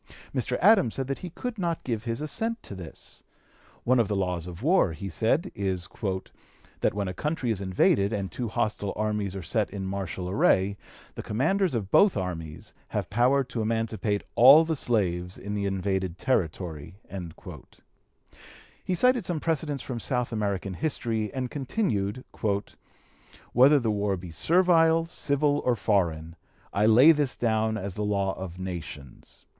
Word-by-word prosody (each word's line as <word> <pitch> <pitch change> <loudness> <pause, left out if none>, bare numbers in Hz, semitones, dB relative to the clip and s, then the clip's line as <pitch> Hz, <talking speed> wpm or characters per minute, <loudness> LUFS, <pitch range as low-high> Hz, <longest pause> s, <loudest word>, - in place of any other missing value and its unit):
Mr. 125 -1 -1
Adams 195 - +5
said 135 - -2
that 135 +1 -3
he 180 - -6
could 230 +6 -6
not 170 -3 -2
give 115 -3 -3
his 115 +3 -3
assent 225 +10 -2
to - - -9
this. 90 -4 -9 0.6
One 125 +1 +3
of 115 - +3
the 105 - -1
laws 90 -3 -2
of 90 +4 -9
war, 160 - +3
he 95 +5 -6
said, 135 - 0
is 95 -3 -2 0.9
"that - - +1
when 100 -1 -1
a 95 - -3
country 140 - -2
is 100 -3 -2
invaded, 100 +1 +2
and 100 -3 -3
two 125 - -3
hostile 105 -2 -2
armies 105 -2 -2
are 95 - -5
set 105 +4 0
in 100 -1 -5
martial 95 -2 -4
array, 95 +1 +2 0.4
the - - -6
commanders 160 - 0
of 100 -4 -3
both 200 - +5
armies 80 -5 -5
have - - -4
power 125 +6 +3
to 125 -3 -4
emancipate 110 -2 -1
all 140 +7 +8
the 160 0 -1
slaves 90 - -1
in 100 +1 -6
the 100 -1 -1
invaded 95 -2 -2
territory." 85 - -2 1.9
He 185 - -1
cited 250 +4 +3
some 175 -3 -2
precedents 150 -4 -2
from 125 -3 -5
South 125 -1 0
American 100 -3 -2
history, 115 - -2
and 130 -2 -4
continued: 130 - -2 1.3
"Whether 135 +5 +6
the 115 -4 0
war 100 -2 0
be 90 -1 -9
servile, 165 - +3
civil, 145 -2 0
or 125 - +2
foreign, 85 -6 0 0.4
I 105 +2 +3
lay 125 +8 +8
this 145 -5 0
down 110 -1 +1
as 100 -2 -4
the 105 - -3
law 100 -2 0
of 90 -2 -7
nations. 85 -8 -8
110 Hz, 160 wpm, -27 LUFS, 95-135 Hz, 1.9 s, all